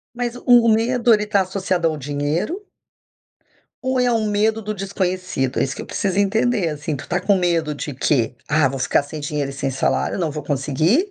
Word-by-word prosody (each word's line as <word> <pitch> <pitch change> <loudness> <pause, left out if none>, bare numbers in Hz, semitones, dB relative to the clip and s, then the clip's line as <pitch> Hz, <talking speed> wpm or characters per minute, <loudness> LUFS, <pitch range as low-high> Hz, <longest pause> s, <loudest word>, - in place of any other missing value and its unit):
Mas 240 -1 -2
o - - -11 0.2
o 230 - +3
medo, 235 +2 +3
ele 210 0 0
tá 205 -1 +2
associado 185 -2 -1
ao 155 - -3
dinheiro 150 - -2 1.2
ou 260 0 0
é 245 -1 +3
um 220 -2 +1
medo 215 +2 +1
do 215 0 -4
desconhecido? 185 -8 -2
É - - +3
isso 135 0 -3
que - - -7
eu - - -7
preciso 195 -1 -1
entender 220 -1 +2
assim, 150 0 -3
tu 140 - -7
está 180 - -1
com 195 +1 +2
medo 165 -4 0
de 145 0 -5
quê? 125 -2 +1
"Ah, 150 -2 +3
vou 135 - -5
ficar 130 - +2
sem 150 +2 -8
dinheiro 145 -1 -2
e 135 - -9
sem 135 0 -2
salário, 135 +7 0
não 165 -4 0
vou 150 0 -5
conseguir", 155 - +1
180 Hz, 210 wpm, -21 LUFS, 145-215 Hz, 1.2 s, o